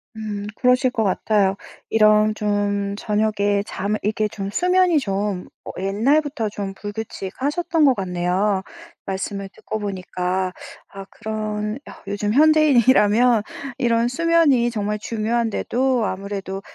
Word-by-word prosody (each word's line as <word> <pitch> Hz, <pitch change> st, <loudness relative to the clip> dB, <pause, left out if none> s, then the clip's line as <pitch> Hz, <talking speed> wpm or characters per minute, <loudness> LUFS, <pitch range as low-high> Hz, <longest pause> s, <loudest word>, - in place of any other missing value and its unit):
음, 210 Hz, -2 st, -5 dB
그러실 250 Hz, 0 st, +3 dB
것 225 Hz, -, 0 dB
같아요. 195 Hz, 0 st, +1 dB, 0.3 s
이런 215 Hz, -1 st, +4 dB
좀 205 Hz, -1 st, -1 dB
저녁에 205 Hz, -1 st, 0 dB
잠을 205 Hz, +1 st, -2 dB
이게 215 Hz, +1 st, 0 dB
좀 195 Hz, -1 st, -5 dB
수면이 360 Hz, -, +3 dB
좀 200 Hz, -5 st, -2 dB, 0.3 s
옛날부터 245 Hz, +7 st, +1 dB
좀 200 Hz, -1 st, -5 dB
불규칙하셨던 255 Hz, -, -2 dB
것 265 Hz, -3 st, +5 dB
같네요. 190 Hz, +1 st, 0 dB, 0.5 s
말씀을 195 Hz, +1 st, -4 dB
듣고 215 Hz, -, -6 dB
보니까. 185 Hz, -2 st, -2 dB, 0.4 s
아 195 Hz, 0 st, -9 dB
그런 215 Hz, 0 st, -4 dB
아 -, -, -12 dB
요즘 205 Hz, +1 st, -1 dB
현대인이라면 250 Hz, -6 st, +5 dB, 0.4 s
이런 235 Hz, -2 st, +2 dB
수면이 285 Hz, -4 st, +3 dB
정말 210 Hz, -1 st, -2 dB
중요한데도 235 Hz, +3 st, 0 dB
아무래도 195 Hz, 0 st, -4 dB
210 Hz, 265 characters per minute, -21 LUFS, 200-240 Hz, 0.5 s, 것